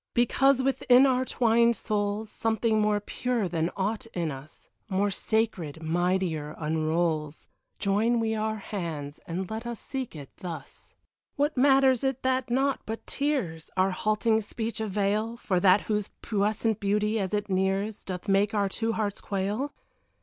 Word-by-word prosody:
Because 265 +2 +4
within 260 -1 +5
our 260 -1 +2
twined 235 -1 +3
souls 210 0 -2
Something 220 -1 +1
more 210 0 +2
pure 235 0 -1
than 165 -1 0
aught 210 +3 -1
in 170 -3 -1
us, 135 +3 -11 0.2
More 200 +1 +1
sacred, 185 -8 -1
mightier, 170 -2 0
unrolls 155 -1 -1 0.3
Join 220 +4 +2
we 225 -1 0
our 220 0 -1
hands, 165 -9 -5
and 180 +3 -3
let 225 +2 -4
us 235 -2 -5
seek 265 -8 -5
it 140 -3 -9
thus. 170 -7 -9 0.4
What 290 +2 +1
matters 265 -1 +4
it 265 -1 -1
that 260 0 +1
naught 270 +2 +1
but 225 +1 -5
tears, 255 - -2
Our 190 +1 +3
halting 215 +3 +1
speech 225 +1 -4
avail 210 +2 0
For 190 -6 0
that 190 +2 +5
whose 210 -2 -1
puissant 215 +1 0
beauty, 210 +2 +1
as 190 -2 -2
it 210 -1 -1
nears, 195 +2 0
Doth 185 +1 -6
make 200 +2 +2
our 200 -1 +2
two 225 +3 -1
hearts 210 -2 -2
quail? 205 +8 -2
210 Hz, 150 wpm, -27 LUFS, 185-230 Hz, 0.4 s, within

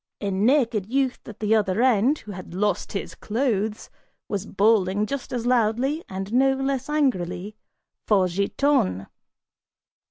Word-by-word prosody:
A 200 -1 -2
naked 225 0 +2
youth 260 +1 0
at 220 - -10
the 215 0 +2
other 210 0 +2
end, 255 +3 +3
who 210 - -10
had 185 -2 -9
lost 205 -1 -1
his 195 - -4
clothes, 220 -2 -2 0.4
was 200 0 -3
bawling 205 -1 +2
just 275 +3 -5
as 240 -2 -3
loudly 250 +6 +1
and 195 +3 -5
no 270 +2 +4
less 270 0 -2
angrily 205 - -1 0.5
for 195 -4 +4
Giton! 195 - +1
215 Hz, 135 wpm, -24 LUFS, 195-260 Hz, 0.5 s, no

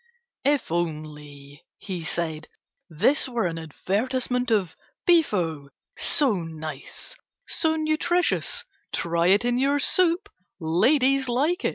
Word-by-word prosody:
"If 285 - +1
only," 150 -4 -5
he 185 -5 -6
said, 160 -1 -3 0.4
"this 260 - +2
were 240 -5 -1
an 165 -1 -2
advertisement 250 - -1
of 200 -6 +1 0.3
Beefo, 180 - +2 0.3
so 280 -6 +3
nice, 160 - -7 0.3
so 320 -1 +1
nutritious, 315 +3 0 0.3
try 170 0 0
it 200 +5 +4
in 245 0 +1
your 280 +2 +2
soup, 340 +4 +3 0.3
ladies 260 - +2
like 300 - +1
it." - - +2
210 Hz, 110 wpm, -25 LUFS, -, 0.4 s, it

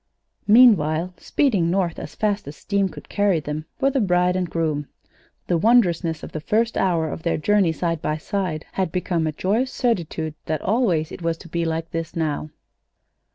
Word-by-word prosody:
Meanwhile, 185 -7 +5
speeding 205 - +1
north 180 -2 0
as - - -8
fast 210 -1 -1
as 145 - -7
steam 200 +1 0
could - - -11
carry 200 -4 +2
them, 150 +1 -5
were 275 0 +3
the 275 - +1
bride 180 -2 +2
and 180 -2 -1
groom. 155 -3 -1 0.6
The 175 -2 +1
wondrousness 175 -7 +3
of - - -7
the 155 - -4
first 225 +7 +1
hour 170 -4 +1
of - - -6
their 170 0 0
journey 195 +1 +3
side 165 0 -2
by 150 - -1
side 170 -2 -3
had 185 -4 -1
become 175 -2 -1
a - - 0
joyous 215 - 0
certitude 170 - -1
that 155 -2 -2
always 190 -9 +1
it - - -8
was 165 -1 -1
to 170 - -13
be 170 0 -2
like 165 0 -3
this 165 -1 -4
now. 155 -2 -2
170 Hz, 185 wpm, -23 LUFS, 160-200 Hz, 0.6 s, Meanwhile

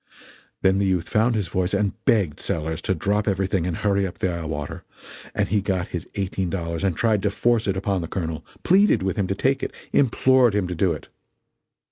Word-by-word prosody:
Then 95 +1 +4
the 100 - +2
youth 90 -2 0
found 115 +2 +2
his 105 -5 -1
voice 90 +2 0
and 100 -2 +1
begged 95 -10 +2
Sellers 80 0 -2
to 95 - 0
drop 100 +5 0
everything 95 -2 0
and 85 - -2
hurry 100 -1 +1
up 90 - -9
the 95 - 0
eye 85 -1 -4
water; 75 -2 -5 0.5
and - - +1
he 105 +1 +2
got 95 -2 -1
his 85 - -5
eighteen 95 -2 -2
dollars 85 -2 -3
and 95 -5 0
tried 110 -3 +2
to 100 - +1
force 115 +2 +1
it 95 -1 0
upon 95 -1 -1
the 80 - -4
Colonel 80 -4 -4 0.2
pleaded 195 - +4
with 95 - -1
him 100 -2 0
to 100 - -1
take 135 +7 +1
it - - -3 0.2
implored 130 -3 +4
him 100 -3 +1
to 90 - -3
do 90 +1 +1
it. 75 - -6
95 Hz, 215 wpm, -23 LUFS, 90-105 Hz, 0.5 s, Then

